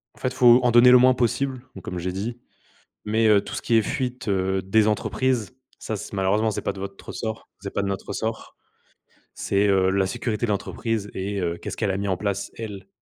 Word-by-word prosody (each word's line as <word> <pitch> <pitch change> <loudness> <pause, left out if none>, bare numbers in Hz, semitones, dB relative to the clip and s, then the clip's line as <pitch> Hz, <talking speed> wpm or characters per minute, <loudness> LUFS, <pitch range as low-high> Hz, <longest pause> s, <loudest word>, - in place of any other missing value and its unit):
en - - -20
fait, 130 0 -2
faut 125 -1 +7
en 120 - +3
donner 120 +1 +7
le 125 - +9
moins 130 +1 +6
possible, 130 +2 0
bon, 95 - -8
comme 90 - -6
j'ai 90 +1 -2
dit, 115 +6 -4 0.7
mais 110 +1 +2
heu, 105 -2 +5
tout - - -7
ce - - -4
qui 115 - +1
est 115 - +6
fuite, 125 +1 -3
heu, 95 -1 0
des 105 +3 +2
entreprises, 120 +1 0 0.3
ça, 110 - -4
c'est 100 - -8
malheureusement, 100 +3 +1
c'est - - -3
pas - - -2
de 95 - -10
votre 100 0 -7
ressort, 110 -1 -5
c'est - - -6
pas - - 0
de 100 - -2
notre 100 -1 -3
ressort, 110 0 -4 0.8
c'est, 100 +1 +1
heu, 95 -1 +3
la 95 0 +2
sécurité 115 +1 -2
de 110 - -1
l'entreprise 105 +1 -2
et 100 +1 -3
heu, 85 -1 -1
qu'est-ce - - -7
qu'elle 95 - 0
a 95 - -2
mis 100 0 -2
en 95 - 0
place 100 0 -3
elle 100 -4 -7
105 Hz, 230 wpm, -24 LUFS, 95-120 Hz, 0.8 s, le